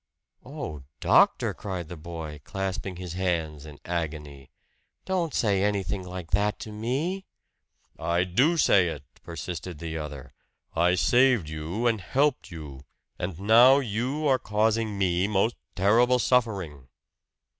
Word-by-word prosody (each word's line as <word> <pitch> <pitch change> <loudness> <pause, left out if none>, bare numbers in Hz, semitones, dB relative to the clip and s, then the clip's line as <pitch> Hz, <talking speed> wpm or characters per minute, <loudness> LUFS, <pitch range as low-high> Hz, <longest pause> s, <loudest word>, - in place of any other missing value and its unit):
"Oh, 75 -2 -6 0.2
doctor!" - - +4
cried 90 -5 -5
the 90 - -7
boy, 80 -2 -7
clasping 95 -1 -4
his 90 -1 -7
hands 80 -5 -2
in 75 -1 -11
agony. 75 -5 -4 0.6
"Don't 180 -4 -1
say 100 -7 +1
anything 100 -2 -1
like 90 -2 -8
that 105 +2 +1
to 110 - -7
me!" 140 - -2 0.7
"I 85 +2 +1
do 130 - +2
say 95 - +4
it!" 75 -4 -5 0.2
persisted 85 0 -6
the 80 0 -5
other. 70 -4 -8 0.4
"I 85 +2 +3
saved 120 -5 +3
you 80 +9 -4
and 115 -4 +2
helped 135 - 0
you; 75 -6 -9 0.4
and 85 -1 -4
now 120 +6 +7
you 130 +4 -2
are 130 -2 +3
causing 110 -1 0
me 90 -1 +1
most 105 +3 +1 0.2
terrible 115 +6 +4
suffering!" 100 - 0
95 Hz, 135 wpm, -26 LUFS, 80-115 Hz, 0.7 s, now